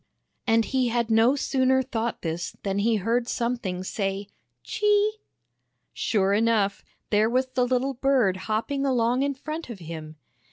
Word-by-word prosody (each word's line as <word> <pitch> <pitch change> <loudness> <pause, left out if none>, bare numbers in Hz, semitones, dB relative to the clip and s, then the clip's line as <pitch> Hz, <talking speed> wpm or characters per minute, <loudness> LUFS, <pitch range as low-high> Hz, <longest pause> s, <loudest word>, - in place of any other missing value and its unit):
And 225 -1 +4
he 260 -2 +1
had 235 -1 0
no 225 +4 +5
sooner 260 -1 +2
thought 235 -2 -3
this 170 +1 -4
than 195 0 -1
he 225 +2 +2
heard 230 +4 0
something 235 -8 -2
say 195 0 -3 0.2
" - - -52
Chee! 420 +1 +2 0.4
" - - -51 0.3
Sure 200 -2 +1
enough, 210 -2 +2 0.3
there 215 +1 +3
was 255 +2 +2
the 250 -1 +2
little 255 +2 0
bird 255 -7 +2
hopping 275 +6 -1
along 250 -2 +2
in 280 0 0
front 310 +2 -6
of 235 - -6
him. 160 -2 -8
235 Hz, 160 wpm, -26 LUFS, 200-260 Hz, 0.4 s, no